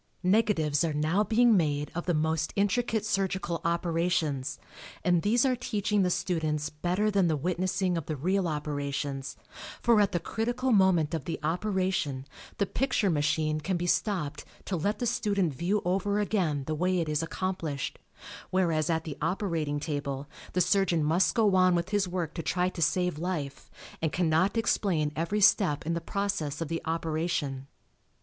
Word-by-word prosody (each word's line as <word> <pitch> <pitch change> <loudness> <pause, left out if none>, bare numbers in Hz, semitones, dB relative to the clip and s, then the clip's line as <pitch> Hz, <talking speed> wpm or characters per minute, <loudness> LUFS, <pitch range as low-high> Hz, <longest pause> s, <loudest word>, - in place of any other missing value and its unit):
Negatives 180 -7 +2
are 160 -3 -1
now 160 +7 +2
being 230 +1 +4
made 150 -4 0
of 175 +1 -4
the 175 - +2
most 160 0 0
intricate 215 +2 +1
surgical 190 -4 -1
operations 170 -4 0 0.5
and 175 -2 +3
these 230 +7 +3
are 255 -1 +2
teaching 210 -4 0
the 180 - +2
students 160 -4 -1
better 180 +7 0
than 195 -3 +3
the 155 -2 +1
witnessing 180 +3 0
of 155 - -10
the 155 - -2
real 185 +6 0
operations, 145 -2 -3 0.4
for 230 -3 +4
at 205 - +2
the 175 - 0
critical 240 +7 -1
moment 185 -7 +4
of 155 -5 -3
the 165 - -3
operation 180 -5 -1 0.3
the 200 - +2
picture 225 -3 0
machine 155 0 +1
can 180 +4 -1
be 175 - -2
stopped 170 -6 -1 0.2
to 190 - -2
let 200 +6 -1
the 245 - -2
student 205 - 0
view 180 +9 -1
over 195 +3 +1
again 180 -9 0
the 155 - -2
way 180 +4 +1
it 165 - -1
is 150 0 0
accomplished, 165 -5 -3 0.5
whereas 170 -5 +1
at 160 -1 +1
the 150 -4 -7
operating 165 -7 -1
table 145 -2 -3 0.3
the 180 - +2
surgeon 185 -4 +2
must 165 +5 +2
go 215 -4 +3
on 185 -1 +5
with 170 +2 -1
his 205 -2 +1
work 175 -3 -3
to 170 - -4
try 180 +2 0
to 185 - -7
save 180 -1 +1
life 155 -6 -4 0.3
and 160 -2 0
cannot 180 +4 +2
explain 175 -9 +1
every 170 +7 -1
step 185 -8 +4
in 165 - 0
the 170 - -2
process 165 -6 -2
of 165 -3 -3
the 165 0 -2
operation. 160 -4 -2
175 Hz, 170 wpm, -28 LUFS, 155-195 Hz, 0.5 s, on